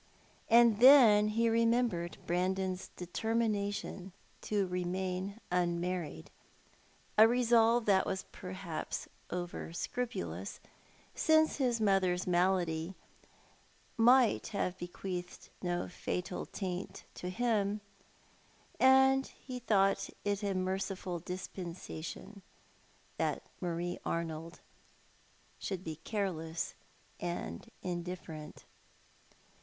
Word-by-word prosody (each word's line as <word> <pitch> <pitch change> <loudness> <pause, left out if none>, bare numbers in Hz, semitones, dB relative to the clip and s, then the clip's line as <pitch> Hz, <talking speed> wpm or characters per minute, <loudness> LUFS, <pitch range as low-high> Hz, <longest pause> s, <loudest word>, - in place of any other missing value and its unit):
And 230 -2 +6
then 235 -5 +8
he 230 +2 +2
remembered 230 -6 +1
Brandon's 185 +1 -1
determination 200 -1 -2 0.3
to 205 -2 0
remain 185 +2 -3
unmarried 175 - -1 0.4
— - - -32
a 220 - +10
resolve 235 -1 +4
that 195 -2 +4
was 190 -1 -2
perhaps 185 -3 -5 0.2
over 175 -1 -4
scrui^ulous, 100 - -4 0.6
since 315 0 +3
his 250 -4 +1
raother's 195 -4 +2
malady 175 -1 +1 1.0
might 245 +1 +5
have 185 -3 -2
be 175 - -4
qi; 180 0 -4
eathed 180 - -16
no 175 -1 -1
fatal 180 0 -4
taint 185 -1 -5
to 180 - -5
him, 210 -1 +1 0.5
— - - -31
and 265 +1 +6
he 255 -2 -8
thought 195 -5 +2 0.2
it 205 0 0
a 200 -2 -1
merciful 185 -1 -2
dispensation 180 +2 -7 0.8
that - - -1 0.2
Marie 175 0 -2
Arnold 165 0 -4 1.0
should 190 -2 -4
be 160 -3 -5
careless 165 -4 -3 0.5
and 85 - -4
indifferent. 175 -3 -6
190 Hz, 95 wpm, -33 LUFS, 175-220 Hz, 1.0 s, a